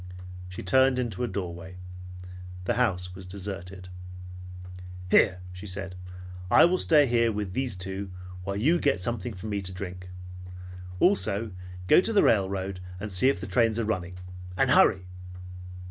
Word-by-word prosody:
She 90 - -7
turned 130 +6 +4
into 120 -3 -2
a - - 0
doorway. 90 -2 -6 0.9
The - - 0
house 90 -7 0
was 95 0 -10
deserted. 95 -1 -6 1.2
"Here," 90 -1 +4
she 90 +3 -9
said, 95 0 -5 0.6
"I - - +7
will 180 +2 +2
stay 150 -3 +5
here 115 -2 +2
with 105 -3 -4
these 130 -4 -1
two, 95 +1 -4 0.3
while 100 +1 -3
you 150 +12 +2
get 140 -10 +1
something 110 +2 -3
for 90 - -9
me 105 -2 -2
to 95 -1 -4
drink. 90 -1 -7 0.9
Also 115 - +2 0.3
go 95 - +6
to 225 - -1
the 205 - +5
railroad 95 -2 +1 0.2
and 105 0 -6
see 95 +9 +4
if 140 - 0
the - - -5
trains 115 -3 +2
are 115 - 0
running. 90 -4 -3 0.4
And 135 +3 +3
hurry!" 95 -7 +5
100 Hz, 155 wpm, -27 LUFS, 90-120 Hz, 1.2 s, I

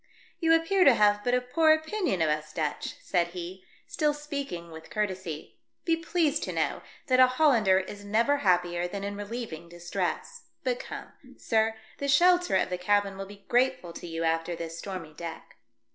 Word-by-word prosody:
" - - -31
You 325 0 +5
appear 365 +4 +3
to 275 -7 +7
have 205 -1 +3
but 245 0 +2
a 250 - +2
poor 315 +6 +3
opinion 315 - 0
of 155 - +2
us 155 0 -3
Dutch," 155 -2 -3
said 175 -2 +1
he, 180 +2 -7 0.2
still 305 -4 0
speaking 280 - -5
with 160 0 -11
courtesy; 185 -7 -4 0.3
"be 330 - +3
pleased 330 -3 0
to - - -4
know - - -1 0.2
that 255 -1 +3
a 255 - +9
Hollander 250 -8 +4
is 200 +2 -4
never 230 +8 +2
happier 175 -5 +1
than 200 +2 -5
in 200 0 -3
relieving 205 -6 -6
distress. 175 - -4 0.2
But - - 0
come, - - -8 0.2
sir, 220 -1 +1 0.2
the 280 - -2
shelter 355 - +4
of 185 - +1
the 180 - -2
cabin 200 +1 +1
will 195 0 -6
be 200 0 -14
grateful 245 -8 +1
to 175 - -8
you 165 0 -3
after 165 +1 0
this 165 0 -6
stormy 185 -6 -6
deck." 165 +1 -8
205 Hz, 185 wpm, -28 LUFS, 175-285 Hz, 0.3 s, a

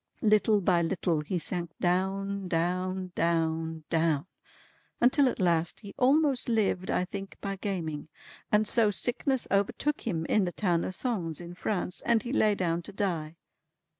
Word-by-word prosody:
Little 210 -1 +4
by 175 -2 +3
little 170 -2 0
he 180 +5 -2
sank 175 +1 -3
down, 195 +2 0
down, 185 +2 -1
down, 160 -1 0
down, 160 -2 +2 0.7
until 255 +2 +5
at - - -5
last 170 -1 +1
he 205 -2 -10
almost 270 -1 +3
lived 205 -5 +1
(I 180 - +1
think) 195 +1 -7
by 195 -1 -3
gaming. 170 -7 -4 0.4
And 210 0 +3
so 225 -1 +3
sickness 250 +5 0
overtook 205 +9 +1
him 165 -6 -1
in 210 +2 +2
the 175 - -2
town 175 -5 +1
of 185 - -3
Sens 180 - -2
in 175 0 -8
France, 180 -1 -2
and 230 -2 +2
he 245 - -4
lay 215 -7 +3
down 170 -3 0
to - - -9
die. 170 -6 -2
185 Hz, 160 wpm, -29 LUFS, 170-210 Hz, 0.7 s, until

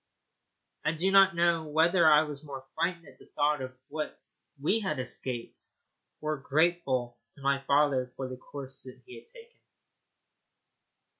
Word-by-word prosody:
I 155 - +1
do 180 +4 0
not 195 -2 +6
know 170 -1 +2
whether 165 +2 +5
I 150 +1 +7
was 150 -1 -7
more 135 -3 -8
frightened 170 +1 -1
at - - -17
the - - -17
thought 150 -1 +2
of 130 0 -7
what 155 +1 -5 0.4
we 175 +10 +2
had 185 -9 -2
escaped 125 -2 -6 0.5
or 155 0 -1
grateful 140 -5 0 0.2
to 140 - -16
my 140 0 +2
father 140 -3 +3
for 130 - -4
the 130 - -6
course 135 0 -8 0.2
he 380 - -11
had - - -22
taken. 470 0 -16
150 Hz, 150 wpm, -29 LUFS, 135-170 Hz, 0.5 s, I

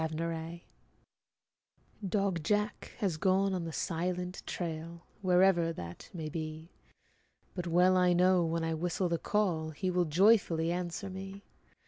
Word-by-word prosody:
JACK 165 +1 -3 1.4
Dog 195 -3 0
Jack 210 +5 -1
has 185 -6 -1
gone 190 +3 +2
on 180 -2 -2
the 165 - -4
silent 180 +3 -2
trail, 170 0 -5 0.2
Wherever 180 -2 +4
that 85 - -8
may 160 -4 -5
be; 155 +1 -6 0.8
But 180 -2 -4
well 180 +2 +4
I 180 -1 +4
know, 180 0 +4
when 165 0 -1
I 165 0 0
whistle 175 +2 -1
the 170 -1 0
call, 180 -7 0
He 185 +4 -2
will 180 -1 +2
joyfully 170 -1 +3
answer 175 +2 -3
me. 195 +1 -8
175 Hz, 135 wpm, -31 LUFS, 165-185 Hz, 1.4 s, Wherever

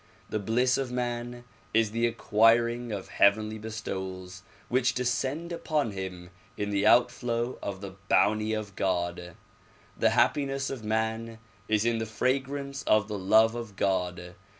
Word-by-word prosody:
The 110 - 0
bliss 125 +5 +1
of 130 -2 -3
man 120 -1 -3 0.3
is 110 -2 +3
the 115 +1 +1
acquiring 115 +1 +2
of 100 -3 -5
heavenly 110 +2 +2
bestowals 95 -4 -6 0.3
which 125 +1 +1
descend 130 +7 -1
upon 155 -7 -1
him 95 -2 -7 0.3
in 105 0 -2
the 100 0 +2
outflow 120 0 +2
of 100 -1 -5
the 100 -1 -6 0.2
bounty 110 +1 +3
of 105 -3 -4
God. 90 -2 -2 0.6
The - - +3
happiness 135 -1 +1
of 130 -5 -6
man 110 +1 -2 0.3
is 110 0 +1
in 115 -1 +1
the 110 - -3
fragrance 140 +4 -2
of 110 -1 +4
the 105 -1 -3
love 110 +4 +4
of 115 -4 -7
God. 90 -2 -1
110 Hz, 145 wpm, -28 LUFS, 100-120 Hz, 0.6 s, of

